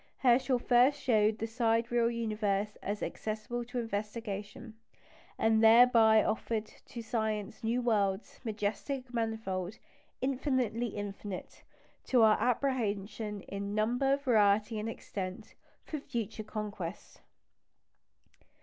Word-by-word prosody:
Herschel 255 0 +3
first 245 +3 +4
showed 215 -3 +2
the 225 - -2
sidereal 230 0 +1
universe 215 -3 -1
as 205 +1 -3
accessible 220 +3 -4
to 245 +1 -6
investigation, 210 0 -4 0.6
and 220 0 +3
thereby 225 -1 +7
offered 220 0 -1 0.2
to 235 - -7
science 220 -1 -2
new 235 +2 0
worlds 205 -4 0
majestic, 235 +4 -3
manifold, 220 -4 -2 0.4
"infinitely 255 -3 0
infinite" 205 -2 -6 0.4
to 245 -3 +4
our 215 -1 +6
apprehension 215 -5 -1
in 200 +2 -5
number, 245 +6 +2
variety, 215 -4 +2
and 215 +2 -3
extent 185 -4 -6 0.3
for 305 - -4
future 225 -5 -4
conquest. 210 -4 -6
220 Hz, 105 wpm, -31 LUFS, 210-240 Hz, 0.6 s, thereby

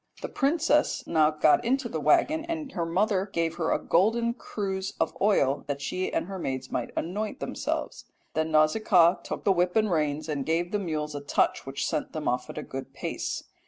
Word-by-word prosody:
The - - -3
princess 300 +1 +1
now 155 -2 +3
got 155 -1 +3
into 255 +1 +1
the 160 - -3
waggon, 310 - +3
and 320 -4 -4
her 170 -1 -2
mother 195 +2 +1
gave 165 -1 -1
her 165 -2 0
a - - +3
golden 230 +6 +2
cruse 195 -5 -4
of - - 0
oil 145 -10 +3
that 140 -1 -2
she 185 +6 -2
and - - -1
her 190 0 -6
maids 130 -4 -4
might - - -2
anoint 205 +6 -3
themselves. - - -3 0.3
"Then 160 0 0
Nausicaa 170 +3 +4
took - - -5
the 200 - +4
whip 180 -1 +1
and 215 -2 +3
reins 150 -1 0
and 145 -3 -2
gave 165 +4 0
the 210 - 0
mules 155 -5 -3
a 145 - -5
touch 140 - 0
which 135 0 -2
sent - - -2
them 155 -1 -4
off 125 0 -1
at - - -8
a - - -3
good 135 0 -7
pace. - - -3
175 Hz, 200 wpm, -27 LUFS, 150-210 Hz, 0.3 s, Nausicaa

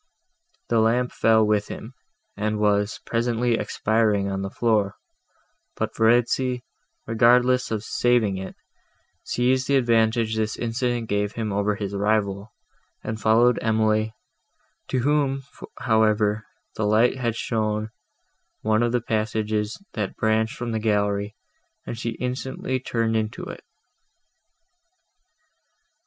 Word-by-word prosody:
The 115 - +3
lamp 120 +3 +2
fell 110 -1 +3
with 105 -1 +1
him, 115 +4 -8 0.4
and 105 +1 -1
was 105 +1 +1
presently 120 0 0
expiring 105 -1 +1
on 95 0 -2
the 95 - -3
floor; 105 -3 +1 0.8
but - - -3
Verezzi, 120 +2 +2 0.4
regardless 125 +3 +3
of 110 -2 -2
saving 115 -5 +1
it, 95 0 -7 0.7
seized 130 +1 +1
the 140 - +3
advantage 115 -2 +2
this 110 -1 -2
accident 120 0 -1
gave 105 0 -1
him 110 -3 -3
over 100 +1 +1
his 100 -1 -4
rival, 100 0 0 0.5
and 110 0 -4
followed 115 +2 +4
Emily, 110 -1 +1 0.8
to 130 - 0
whom, 140 0 +1 0.4
however, 110 -2 +2 0.3
the 110 - -1
light 115 +5 +3
had 120 -3 -1
shown 110 -2 -1 0.7
one 110 +1 +2
of 120 0 +1
the 125 - +1
passages 110 +1 -1
that 105 -4 -3
branched 110 0 +1
from 120 -1 -4
the 110 - -1
gallery, 105 -1 0 0.5
and - - -5
she 115 0 -4
instantly 130 +1 -3
turned 115 -3 -1
into 110 -1 -2
it. - - -8
110 Hz, 120 wpm, -24 LUFS, 105-120 Hz, 0.8 s, followed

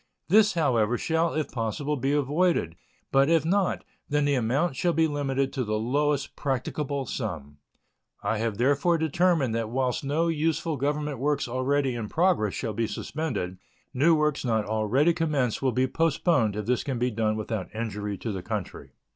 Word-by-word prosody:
This, 210 +3 +5
however, 120 -7 +2
shall 165 +3 0
if 155 -3 -2
possible 130 +6 -2
be 135 +1 -1
avoided, 145 - +1 0.4
but 135 +2 +4
if 165 -2 +3
not, 190 +2 +1 0.3
then 145 0 +1
the 145 - +2
amount 135 +6 +1
shall 175 +5 +1
be 160 0 +3
limited 140 -3 -1
to 130 - -1
the 110 -1 -1
lowest 140 +5 0
practicable 140 +1 -2
sum. 75 - -5 0.7
I 110 - 0
have 110 -2 -1
therefore 145 +7 +2
determined 160 -4 +1
that 115 -1 -2
whilst 130 +2 -1
no 150 +5 +1
useful 160 0 0
Government 145 0 -2
works 145 0 0
already 130 +2 0
in 115 -3 -4
progress 165 - +2
shall 110 - -3
be 115 +2 -1
suspended, 105 - -4 0.3
new 155 +5 +4
works 150 -1 0
not 110 -4 +1
already 110 +10 +2
commenced 145 -8 0
will 130 -1 +2
be 130 +2 +2
postponed 140 - +1
if 105 -1 -3
this 125 0 0
can 135 -3 -3
be 125 +1 0
done 110 -1 0
without 110 -2 -4
injury 105 -2 -4
to 115 - -4
the 95 -2 -4
country. - - -5
135 Hz, 170 wpm, -26 LUFS, 115-155 Hz, 0.7 s, This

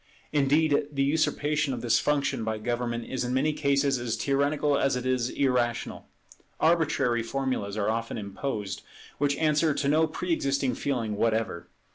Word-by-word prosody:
Indeed 145 +1 +3
the 140 -1 0
usurpation 150 -1 +1
of 120 - -6
this 120 -1 +3
function 140 -4 0
by 110 0 -2
government 120 +1 -2
is 130 - -3
in 125 +1 -1
many 150 +4 +2
cases 140 -2 +1
as 120 -2 -2
tyrannical 145 +1 +1
as 135 -1 +2
it 125 0 -3
is 130 -1 +1
irrational; 125 -4 -1 0.5
arbitrary 155 -7 +2
formulas 115 -4 -2
are 100 - 0
often 115 +1 -2
imposed, 105 0 -4 0.4
which 140 0 +1
answer 155 0 +2
to 140 - -1
no 155 +3 +3
pre 170 +2 -2
existing 135 -4 0
feeling 115 -7 -2
whatever. 110 -7 0
135 Hz, 155 wpm, -27 LUFS, 120-145 Hz, 0.5 s, Indeed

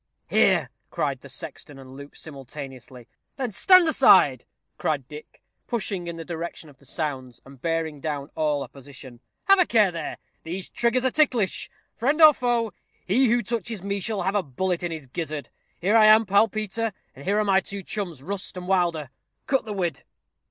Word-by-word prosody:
"Here," - - +3 0.2
cried - - -2
the - - -12
sexton 145 - -7
and 130 -1 -12
Luke 140 +1 -11
simultaneously. 135 -4 -9 0.3
"Then 255 -4 -2
stand 365 - +7
aside," 320 - +5 0.3
cried - - -1
Dick, 455 - -12 0.2
pushing 195 -6 -3
in 170 - -5
the 165 -1 -8
direction 165 -2 -6
of 135 - -23
the 140 - -18
sounds, 130 -6 -4
and 135 -2 -15
bearing 165 -3 -2
down 145 -1 -4
all 150 -3 0
opposition. 135 -3 -12 0.2
"Have 390 -1 +5
a 360 - +5
care 215 -5 +4
there 165 -1 -5 0.2
these 180 +3 -6
triggers 240 +2 0
are 260 - +2
ticklish. 245 - +1 0.3
Friend 280 +7 +1
or 310 -2 +9
foe, 240 -4 0 0.3
he 250 +8 +3
who 240 +1 +2
touches 225 -2 -4
me 200 0 -2
shall 205 0 -2
have 190 +2 0
a 205 - +2
bullet 180 +4 -2
in 175 -1 -3
his 160 -4 -6
gizzard. 150 +2 -5 0.3
Here 200 +6 +1
I 215 -1 +7
am, 215 +1 +7
pal 200 +3 +4
Peter; 215 +1 -3 0.2
and 135 - -12
here 200 +2 +1
are 215 - +2
my 195 -1 +4
two 200 0 -7
chums, 175 -9 -5
Rust 190 +2 -5
and 180 0 -7
Wilder. 170 -7 0 0.3
Cut 270 -3 +1
the 215 - -5
whid." 175 -7 -3
185 Hz, 185 wpm, -25 LUFS, 150-220 Hz, 0.3 s, or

